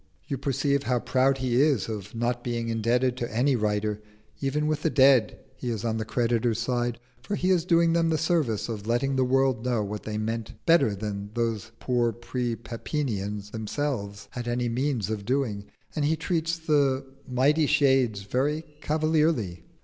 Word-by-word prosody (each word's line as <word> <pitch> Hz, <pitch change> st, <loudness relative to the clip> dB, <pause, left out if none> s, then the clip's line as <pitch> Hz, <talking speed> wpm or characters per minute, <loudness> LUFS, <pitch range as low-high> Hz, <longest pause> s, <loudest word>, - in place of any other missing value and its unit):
You 140 Hz, -, -1 dB
perceive 140 Hz, +1 st, +1 dB
how 125 Hz, -2 st, 0 dB
proud 130 Hz, +3 st, +2 dB
he 130 Hz, -1 st, +2 dB
is 140 Hz, -9 st, +2 dB
of 105 Hz, -1 st, -6 dB
not 120 Hz, +1 st, -1 dB
being 120 Hz, -1 st, -2 dB
indebted 120 Hz, +3 st, +1 dB
to 120 Hz, -1 st, -3 dB
any 130 Hz, +5 st, +2 dB
writer: 105 Hz, -1 st, -1 dB, 0.4 s
even 145 Hz, +2 st, 0 dB
with 155 Hz, -1 st, 0 dB
the 160 Hz, -, +2 dB
dead 130 Hz, -6 st, +5 dB, 0.2 s
he 125 Hz, -, -5 dB
is 115 Hz, -1 st, -3 dB
on 110 Hz, -1 st, 0 dB
the 110 Hz, -, -3 dB
creditor's 115 Hz, -1 st, +1 dB
side, 120 Hz, 0 st, -1 dB, 0.2 s
for 200 Hz, +11 st, -3 dB
he 185 Hz, -1 st, +1 dB
is 175 Hz, -3 st, +2 dB
doing 170 Hz, -2 st, +4 dB
them 165 Hz, -1 st, +2 dB
the 160 Hz, -, +2 dB
service 145 Hz, -, 0 dB
of 110 Hz, -3 st, -5 dB
letting 125 Hz, +4 st, +1 dB
the 130 Hz, -, +3 dB
world 130 Hz, -2 st, +2 dB
know 120 Hz, -4 st, +1 dB
what 105 Hz, +1 st, -4 dB
they 105 Hz, -1 st, -4 dB
meant 110 Hz, +1 st, -3 dB
better 165 Hz, -11 st, +4 dB
than 100 Hz, 0 st, -4 dB
those 115 Hz, -2 st, -1 dB
poor 120 Hz, -2 st, +1 dB
pre 120 Hz, 0 st, -3 dB
Pepinians 105 Hz, -5 st, -4 dB
themselves 110 Hz, -3 st, -3 dB
had 120 Hz, -1 st, -5 dB
any 120 Hz, 0 st, 0 dB
means 120 Hz, -4 st, -1 dB
of 105 Hz, -2 st, -3 dB
doing, 115 Hz, -4 st, -1 dB, 0.3 s
and 155 Hz, -, 0 dB
he 155 Hz, +2 st, +2 dB
treats 165 Hz, 0 st, -1 dB
the 140 Hz, -4 st, +1 dB, 0.2 s
mighty 145 Hz, +5 st, +3 dB
shades 135 Hz, -8 st, +3 dB
very 140 Hz, +9 st, 0 dB, 0.2 s
cavalierly. 155 Hz, -, +1 dB
125 Hz, 175 wpm, -27 LUFS, 110-145 Hz, 0.4 s, dead